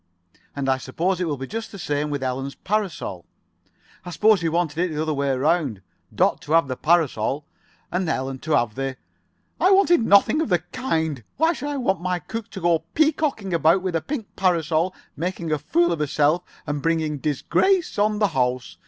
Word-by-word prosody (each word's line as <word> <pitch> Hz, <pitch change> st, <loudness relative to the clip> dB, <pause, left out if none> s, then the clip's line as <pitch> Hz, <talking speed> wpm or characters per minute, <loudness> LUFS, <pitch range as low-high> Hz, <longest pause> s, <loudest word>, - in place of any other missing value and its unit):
"And 140 Hz, -1 st, -2 dB
I 130 Hz, 0 st, +2 dB
suppose 175 Hz, +8 st, -1 dB
it -, -, +1 dB
will 145 Hz, -3 st, -2 dB
be 135 Hz, -, -5 dB
just 225 Hz, +7 st, -6 dB
the 200 Hz, -, -9 dB
same 150 Hz, -4 st, -2 dB
with 145 Hz, -2 st, -3 dB
Ellen's 135 Hz, +2 st, -3 dB
parasol. 185 Hz, -, -3 dB, 0.8 s
I 175 Hz, -, -7 dB
suppose 205 Hz, +3 st, +3 dB
you 165 Hz, -1 st, 0 dB
wanted 170 Hz, -2 st, -1 dB
it 180 Hz, -1 st, +1 dB
the 150 Hz, -, -4 dB
other 155 Hz, 0 st, 0 dB
way 140 Hz, -1 st, -1 dB
round—Dot 135 Hz, -, -1 dB
to 155 Hz, -, -3 dB
have 165 Hz, -3 st, +4 dB
the 130 Hz, -, -3 dB
parasol 150 Hz, -4 st, +1 dB, 0.5 s
and 180 Hz, -2 st, -1 dB
Ellen 130 Hz, -3 st, -2 dB
to 155 Hz, +3 st, -2 dB
have 120 Hz, -5 st, +2 dB
the——" 135 Hz, +1 st, -4 dB, 0.6 s
"I 370 Hz, -, +4 dB
wanted 385 Hz, -6 st, +5 dB
nothing 200 Hz, +9 st, +5 dB
of 320 Hz, -, -1 dB
the 180 Hz, -, +4 dB
kind. 160 Hz, -, -2 dB
Why 325 Hz, +4 st, +3 dB
should 290 Hz, -2 st, -5 dB
I 290 Hz, -, -2 dB
want 195 Hz, -9 st, 0 dB
my 180 Hz, 0 st, 0 dB
cook 225 Hz, +6 st, -6 dB
to 190 Hz, -, -8 dB
go 170 Hz, -1 st, +3 dB, 0.2 s
peacocking 295 Hz, -, +1 dB
about 170 Hz, +3 st, +3 dB
with 185 Hz, -3 st, -2 dB
a 165 Hz, -, +1 dB
pink 255 Hz, -, -6 dB
parasol, 170 Hz, -1 st, +1 dB, 0.2 s
making 170 Hz, +1 st, -3 dB
a 155 Hz, -, +1 dB
fool 170 Hz, +4 st, +2 dB
of 170 Hz, -, -1 dB
herself, 150 Hz, +3 st, +2 dB, 0.2 s
and 145 Hz, -1 st, -3 dB
bringing 160 Hz, -2 st, 0 dB
disgrace 335 Hz, -, +1 dB
on 210 Hz, +1 st, +2 dB
the 210 Hz, -1 st, +2 dB
house? 125 Hz, -3 st, -1 dB
165 Hz, 195 wpm, -23 LUFS, 145-195 Hz, 0.8 s, wanted